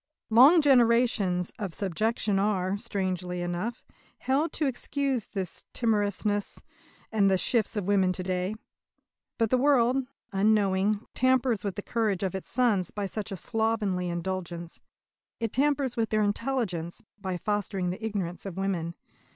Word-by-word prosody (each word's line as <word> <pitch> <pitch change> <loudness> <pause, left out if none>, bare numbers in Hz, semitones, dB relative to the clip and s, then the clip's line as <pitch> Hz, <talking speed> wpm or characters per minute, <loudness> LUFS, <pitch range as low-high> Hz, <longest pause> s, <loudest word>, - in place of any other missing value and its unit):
"Long 280 +9 +7
generations" 235 -9 +3
of 195 -6 -4
subjection 205 +2 0
are, 195 -2 +1
strangely 185 -5 -3
enough, 175 +8 -4 0.3
held 280 +5 0
to 310 - 0
excuse 270 -2 -1
the 195 -2 -3 0.3
timorousness 205 -2 0 0.5
and 205 -3 +3
the 190 - +3
shifts 220 +3 +1
of 205 -3 -2
women 195 -2 +3
to 185 - -4
day. 185 +2 -1 0.8
But 225 -2 +1
the 255 - +4
world, 260 -2 +4 0.3
unknowing, 200 0 +2
tampers 255 -4 +2
with 200 -3 -3
the 205 - -5
courage 215 -5 0
of 190 - -1
its 190 - -6
sons 230 -7 +2
by 205 -1 -4
such 205 +1 -5
a 195 - -4
slovenly 210 -4 -1
indulgence. 170 -1 -4 0.6
It 225 -2 -2
tampers 280 -2 +1
with 225 -2 0
their 215 -1 +2
intelligence 205 -6 -2 0.2
by 190 -2 -3
fostering 195 -2 -1
the 200 +5 -7
ignorance 195 -4 -3
of 190 -2 -7
women. 175 -4 -2
205 Hz, 145 wpm, -28 LUFS, 185-230 Hz, 0.8 s, Long